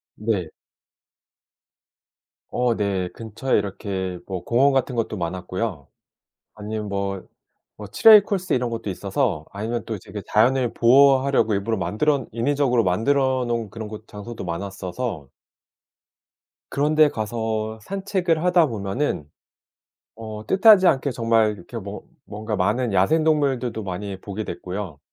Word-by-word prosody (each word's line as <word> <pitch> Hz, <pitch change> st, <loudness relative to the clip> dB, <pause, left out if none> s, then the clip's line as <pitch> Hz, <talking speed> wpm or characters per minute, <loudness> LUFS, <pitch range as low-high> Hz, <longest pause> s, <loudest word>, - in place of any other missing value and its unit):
네. 105 Hz, -6 st, -2 dB, 2.0 s
어 125 Hz, -1 st, +1 dB
네. 95 Hz, -4 st, -1 dB
근처에 115 Hz, +5 st, -1 dB
이렇게 95 Hz, -2 st, -4 dB
뭐 95 Hz, -3 st, -5 dB
공원 135 Hz, +7 st, +3 dB
같은 130 Hz, -1 st, 0 dB
것도 115 Hz, -2 st, -2 dB
많았고요. 90 Hz, -1 st, -4 dB, 0.7 s
아니면 105 Hz, 0 st, -5 dB
뭐, 100 Hz, -1 st, -3 dB, 0.5 s
뭐 105 Hz, -, -8 dB
트레일 210 Hz, -, +7 dB
코스 195 Hz, -2 st, -1 dB
이런 125 Hz, -1 st, 0 dB
것도 115 Hz, -2 st, -5 dB
있어서 100 Hz, -, -1 dB
아니면 115 Hz, +4 st, -3 dB
또 110 Hz, -2 st, -4 dB
되게 100 Hz, +2 st, -8 dB
자연을 125 Hz, +3 st, +2 dB
보호하려고 135 Hz, 0 st, +4 dB
일부러 105 Hz, +3 st, 0 dB
만들언 135 Hz, +8 st, 0 dB
인위적으로 125 Hz, 0 st, +1 dB
만들어 130 Hz, +7 st, +1 dB
놓은 120 Hz, -1 st, -1 dB
곳 105 Hz, -, -14 dB
그런 110 Hz, -1 st, -7 dB, 0.2 s
장소도 105 Hz, +3 st, -8 dB
많았어서 95 Hz, -, -5 dB, 1.4 s
그런 145 Hz, +2 st, +1 dB
데 155 Hz, -1 st, +6 dB
가서 110 Hz, -1 st, -3 dB
산책을 185 Hz, -, -1 dB
하다 180 Hz, -3 st, +4 dB
보면은 105 Hz, -, -2 dB, 0.9 s
어 110 Hz, -1 st, -8 dB
뜻하지 195 Hz, -, +6 dB
않게 140 Hz, -3 st, +2 dB
정말 115 Hz, -2 st, +2 dB
이렇게 110 Hz, +3 st, -8 dB
뭔 100 Hz, -1 st, -7 dB, 0.3 s
뭔가 105 Hz, +1 st, -4 dB
많은 115 Hz, +5 st, 0 dB
야생동물들도 135 Hz, +1 st, +1 dB
많이 95 Hz, +1 st, -5 dB
보게 105 Hz, +2 st, -5 dB
됐고요. 90 Hz, -6 st, -6 dB
110 Hz, 285 characters per minute, -23 LUFS, 100-130 Hz, 2.0 s, 트레일